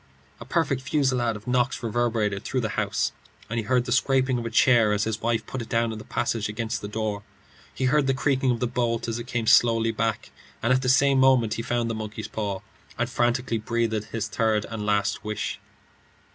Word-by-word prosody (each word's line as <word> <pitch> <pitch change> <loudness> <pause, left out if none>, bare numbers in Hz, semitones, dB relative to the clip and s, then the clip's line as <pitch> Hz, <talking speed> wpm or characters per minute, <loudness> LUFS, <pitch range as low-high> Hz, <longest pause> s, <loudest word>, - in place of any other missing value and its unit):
A - - -9
perfect 145 -6 0
fusillade 130 -4 +1
of 105 0 -10
knocks 125 0 0
reverberated 110 -3 0
through 130 - -1
the 110 - -2
house, - - -1 0.4
and 115 - 0
he 110 - -3
heard 125 +2 +2
the 125 - -4
scraping 130 0 +2
of 115 - -4
a - - -3
chair 115 -2 +4
as 105 0 +1
his 110 0 -2
wife 115 -1 0
put 130 - -5
it 115 - -8
down 115 0 +1
in 110 - -6
the - - -9
passage 105 -3 -2
against 110 +2 -3
the 105 - -5
door. 105 -1 -3 0.5
He 130 - -2
heard 140 +1 +3
the 135 - +2
creaking 135 -1 +1
of 120 -1 0
the - - +2
bolt 120 -1 -1
as 115 0 -2
it 120 - -7
came 120 -2 -2
slowly 115 0 +4
back, 110 -1 -2 0.3
and 120 +2 +3
at 130 - +2
the 125 - 0
same 135 +1 +4
moment 130 -4 +4
he 115 - -3
found 120 0 -1
the 115 - -2
monkey's 110 -1 -5
paw, 100 -3 -3 0.4
and 120 +1 -1
frantically 120 -1 0
breathed 110 -1 -1
his 115 -2 -3
third 110 -2 0
and 105 -2 -4
last 105 -1 0
wish. 105 0 -3
115 Hz, 215 wpm, -25 LUFS, 110-125 Hz, 0.5 s, chair